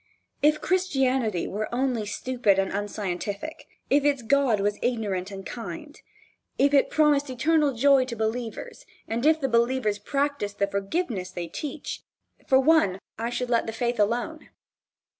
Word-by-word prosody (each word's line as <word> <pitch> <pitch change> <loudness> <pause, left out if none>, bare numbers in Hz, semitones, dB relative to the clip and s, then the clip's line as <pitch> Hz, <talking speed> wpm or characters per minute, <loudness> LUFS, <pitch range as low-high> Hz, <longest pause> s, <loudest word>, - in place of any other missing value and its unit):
If 300 +1 +3
Christianity 265 - +1
were 215 +2 -3
only 245 -3 -1
stupid 225 -2 +1
and 195 0 0
unscientific, 205 - -4 0.2
if 285 0 +3
its 285 -4 +1
God 255 -3 +3
was 205 +1 0
ignorant 205 -6 -1
and 195 -1 -8
kind, 295 +6 -8 0.6
if 280 +1 +3
it 280 - +4
promised 295 -2 +3
eternal 295 +4 +2
joy 270 +2 +5
to 245 -2 -5
believers 225 +1 -4 0.2
and 230 +2 -2
if 315 0 +4
the 270 - 0
believers 235 -3 +1
practiced 275 -4 -2
the 200 - +2
forgiveness 200 - -2
they 175 -2 -5
teach, 285 - -6 0.5
for 265 -1 +5
one 280 - +4 0.2
I 230 +1 -1
should 245 0 -3
let 230 -1 +2
the 225 - -3
faith 240 0 -1
alone. 240 +9 -1
240 Hz, 150 wpm, -26 LUFS, 205-280 Hz, 0.6 s, joy